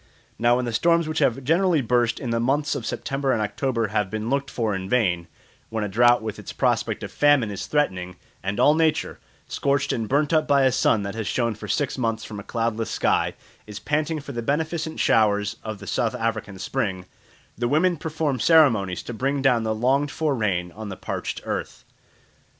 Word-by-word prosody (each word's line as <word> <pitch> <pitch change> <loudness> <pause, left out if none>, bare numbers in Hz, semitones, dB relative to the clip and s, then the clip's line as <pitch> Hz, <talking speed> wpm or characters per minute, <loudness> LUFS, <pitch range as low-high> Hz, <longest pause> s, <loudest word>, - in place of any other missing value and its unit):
Now 120 +1 +4
when 125 0 -1
the 120 - -3
storms 170 +6 +3
which 155 - -2 0.2
generally 170 +3 +3
burst 120 -2 +1
in 120 - -4
the 115 - +1
months 145 +6 +1
of 115 - -4
September 135 0 -2
and - - 0
October 115 +1 -1
have 105 -2 0
been 110 +3 -3
looked 140 0 0
for 115 -5 -1
in 95 0 -4
vain, 90 -9 +1 0.4
when 110 -1 -2
a - - -1
drought 120 +3 +4
with 110 -2 -5
its - - -8
prospect - - 0
of - - -6
famine 145 -7 +3
is 100 - -5
threatening, 90 -12 -1 0.3
and 95 +2 -3
all 150 - +6
nature, 160 0 0 0.3
scorched 140 0 0
and 115 -3 -3
burnt 145 +3 +1
up 155 -1 +3
by 140 -2 +4
a 130 - +4
sun 115 -4 +2
that 100 0 -4
has 110 -2 -4
shone 115 -2 0
for 105 - -9
six 140 -2 -1
months 115 -2 -1
from 105 -2 -7
a - - -8
cloudless 115 0 -2
sky, - - +1 0.3
is 105 -1 -8
panting 155 +4 -1
for 140 - -8
the 120 -3 -4
beneficent 160 +5 -2
showers 105 -2 +2
of 110 -1 -5
the 100 - -11
South 90 - -1
African 110 -3 -3
spring, 95 -4 -2 0.5
the 120 +2 -1
women 165 +7 +2
perform 155 -4 -2
ceremonies 115 - +4
to 120 - -6
bring 135 +4 -1
down 125 -4 +4
the 110 -1 -1
longed 135 +6 +1
for 155 0 -1
rain 95 -7 -1
on 110 +3 -8
the 95 - -7
parched - - -4
earth. - - -4
120 Hz, 200 wpm, -24 LUFS, 110-145 Hz, 0.5 s, all